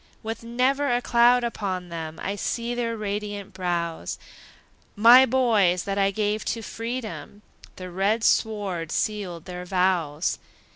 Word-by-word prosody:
With 225 +1 -5
never 255 +4 +1
a 245 - +2
cloud 245 0 +4
upon 190 -6 -3
them, 160 -1 -6
I 200 - -2
see 235 +4 -2
their 230 -1 -2
radiant 205 -1 -4
brows; 170 - -3 0.8
My 240 +5 +8
boys 215 -8 +3
that 200 0 -2
I 195 0 +3
gave 210 +1 -1
to 230 - -2
freedom, 215 - -6 0.3
The 185 -1 -8
red 200 +5 0
sword 195 -9 0
sealed 190 -6 -2
their 180 -1 -6
vows! 180 -4 0
205 Hz, 135 wpm, -25 LUFS, 180-230 Hz, 0.8 s, My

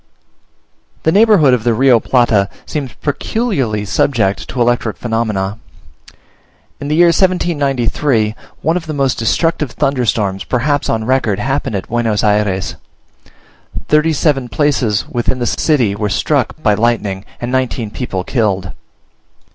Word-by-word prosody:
The 160 - +3
neighbourhood 200 - +5
of 120 -3 +1
the 120 -1 +2
Rio 125 0 +4
Plata 110 -6 +2 0.2
seems 140 -5 -4
peculiarly 140 - -1
subject 100 -2 0
to 130 - -5
electric 120 -2 +1
phenomena. 110 -3 -2 1.2
In 145 - -5
the 150 - 0
year 170 +1 +6
1793, 145 - +1 0.3
one 160 +3 +2
of 165 -3 -6
the 155 - -4
most 135 -3 0
destructive 150 +5 0
thunderstorms 110 -7 0
perhaps 145 +3 0
on 110 -1 0
record 125 -5 +1
happened 135 -2 -2
at 95 - -4
Buenos 115 -3 0
Ayres: 105 -3 0 1.1
thirty 150 +2 +3
seven 135 -4 0
places 130 -9 0
within 120 +1 -1
the 120 - -2
city 125 -7 +1
were 105 +1 -2
struck 95 - 0
by 105 - +4
lightning, 105 -3 0 0.2
and 120 +1 -4
nineteen 125 -4 -1
people 95 -7 -4
killed. 100 -7 -1
120 Hz, 130 wpm, -15 LUFS, 105-145 Hz, 1.2 s, year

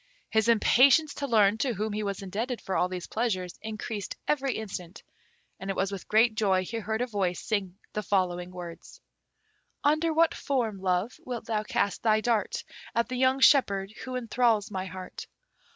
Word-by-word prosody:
His 220 0 +2
impatience 270 +6 +5
to 280 - -4
learn 215 -3 +4
to 250 -2 0
whom 210 +2 -2
he 210 - -2
was 200 -1 -3
indebted 225 +6 -3
for 190 - -4
all 180 - +2
these 180 -1 -5
pleasures 190 -6 -2
increased 215 -1 -5
every 275 -3 +1
instant, 195 -4 -6 0.6
and 195 0 -6
it 195 - -1
was 195 +1 0
with 195 -3 -7
great 225 +1 +4
joy 195 -4 +2
he 230 - -4
heard 220 +1 -2
a - - +2
voice 195 -7 -1
sing 195 -4 -2 0.2
the 210 - -1
following 180 -3 0
words: 175 -2 -9 0.8
Under 310 +3 +3
what 325 +1 +3
form, 235 -8 -1
Love, 185 +4 -1
wilt 245 -3 -5
thou 215 -2 0
cast 205 -1 -1
thy 215 -1 +3
dart 220 -3 0 0.3
At 235 +2 +1
the 255 - -3
young 260 +1 +2
shepherd 200 -8 +4
who 255 -1 -5
enthrals 230 -3 +1
my 190 -1 -3
heart? 185 0 -8
215 Hz, 180 wpm, -28 LUFS, 190-245 Hz, 0.8 s, impatience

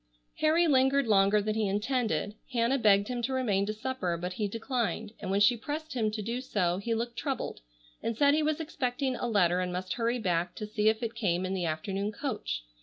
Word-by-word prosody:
Harry 320 +3 +3
lingered 275 -2 +4
longer 205 -1 +4
than 215 +1 0
he 215 -1 0
intended. 215 +1 0 0.2
Hannah 240 +3 +2
begged 200 -2 +4
him 245 -1 -3
to 255 +3 -1
remain 205 -7 +1
to 215 - -1
supper, 215 -6 -2
but 180 +2 -4
he 210 +2 -1
declined, 225 -1 -2
and - - -5
when 195 +1 +2
she 205 +4 +5
pressed 300 +7 -5
him 225 -4 +1
to 215 0 -4
do 235 +4 -3
so 185 -9 0
he 230 +3 -1
looked 235 +1 -3
troubled 270 -4 -3 0.4
and 230 -1 -2
said 285 +1 +5
he 310 - +3
was 310 +1 0
expecting 265 -4 -2
a 245 - -2
letter 180 -6 +3
and 180 0 -1
must 180 +1 -3
hurry 235 +1 0
back 175 -5 -1
to 215 - -5
see 210 0 +2
if 220 +2 -1
it 230 0 -2
came 185 -6 0
in 185 - -2
the 185 -2 -1
afternoon 195 +6 -2
coach. 210 - -3
220 Hz, 220 wpm, -29 LUFS, 195-255 Hz, 0.4 s, she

